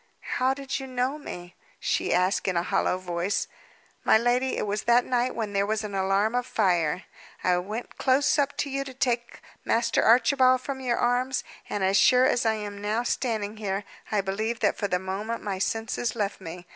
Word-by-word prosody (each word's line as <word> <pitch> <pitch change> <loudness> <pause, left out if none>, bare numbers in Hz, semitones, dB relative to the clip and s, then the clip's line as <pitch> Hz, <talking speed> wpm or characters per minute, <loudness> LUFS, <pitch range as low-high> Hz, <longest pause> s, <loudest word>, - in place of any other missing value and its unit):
"How 260 +1 +2
did 275 0 -4
you 265 - -7
know 255 +3 -1
me?" 175 -10 -8 0.3
she - - 0
asked 180 +3 +2
in 185 -2 +1
a 170 - +1
hollow 180 - +1
voice. 180 +1 -2 0.6
"My - - +6
lady, 245 +3 +1
it - - -1
was 210 +1 -2
that 240 +1 +4
night 250 0 0
when 215 -3 -3
there 200 0 +1
was 220 +1 -1
an 210 -1 -5
alarm 195 +3 +1
of 245 0 -1
fire. 180 -7 +1 0.4
I 180 -1 +3
went 210 +6 -6
close 265 +2 +3
up 285 0 0
to 285 - -1
you 275 0 -1
to 265 -2 -10
take 240 -2 -1 0.2
Master 230 0 +2
Archibald 255 +2 +5
from 270 0 -5
your 250 -2 0
arms; 250 +2 +1 0.3
and, 205 - -2
as 190 +1 +3
sure 250 +3 +6
as 245 -4 +2
I 220 - +2
am 205 -1 -6
now 215 +3 0
standing 220 -4 -2
here, 200 -1 -2 0.3
I 210 -2 +2
believe 215 +4 -2
that - - +2
for 205 - -2
the 180 - +1
moment 195 +5 -4
my 195 -2 -3
senses 225 +3 -1
left 205 -3 -2
me. 175 0 -8
220 Hz, 200 wpm, -26 LUFS, 195-250 Hz, 0.6 s, My